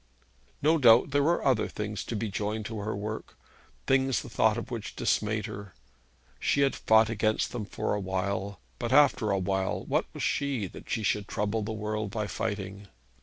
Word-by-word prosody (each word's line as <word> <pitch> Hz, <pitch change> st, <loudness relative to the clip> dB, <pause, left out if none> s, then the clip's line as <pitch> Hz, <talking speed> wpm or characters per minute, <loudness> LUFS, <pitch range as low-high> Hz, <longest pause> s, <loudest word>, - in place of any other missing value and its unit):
No 160 Hz, +2 st, +4 dB
doubt 120 Hz, +1 st, +6 dB
there 145 Hz, +1 st, +3 dB
were 165 Hz, +4 st, +1 dB
other 130 Hz, -5 st, +3 dB
things 105 Hz, 0 st, -4 dB
to 115 Hz, -, -4 dB
be 110 Hz, -1 st, -2 dB
joined 105 Hz, +2 st, -2 dB
to 110 Hz, -1 st, -5 dB
her 105 Hz, +1 st, -3 dB
work, 105 Hz, +2 st, -6 dB, 0.5 s
things 135 Hz, -1 st, +2 dB
the -, -, -10 dB
thought -, -, +3 dB
of -, -, -6 dB
which -, -, -5 dB
dismayed 110 Hz, 0 st, 0 dB
her. 100 Hz, -3 st, -8 dB, 0.6 s
She 140 Hz, -, +2 dB
had 135 Hz, -1 st, +3 dB
fought 110 Hz, 0 st, +4 dB
against 110 Hz, 0 st, 0 dB
them 115 Hz, -4 st, -4 dB
for 100 Hz, -, -2 dB
a 105 Hz, -, 0 dB
while; 95 Hz, 0 st, -2 dB, 0.2 s
but, 120 Hz, -, -2 dB
after 135 Hz, -6 st, +5 dB
all, 95 Hz, 0 st, 0 dB
what -, -, +1 dB
was -, -, -6 dB
she, 140 Hz, -7 st, 0 dB
that 90 Hz, -, -10 dB
she 110 Hz, -, -1 dB
should 100 Hz, 0 st, 0 dB
trouble 105 Hz, +2 st, -1 dB
the 110 Hz, +1 st, -3 dB
world 110 Hz, 0 st, -3 dB
by 105 Hz, +1 st, -2 dB
fighting? 100 Hz, -2 st, -4 dB
110 Hz, 185 wpm, -28 LUFS, 100-115 Hz, 0.6 s, doubt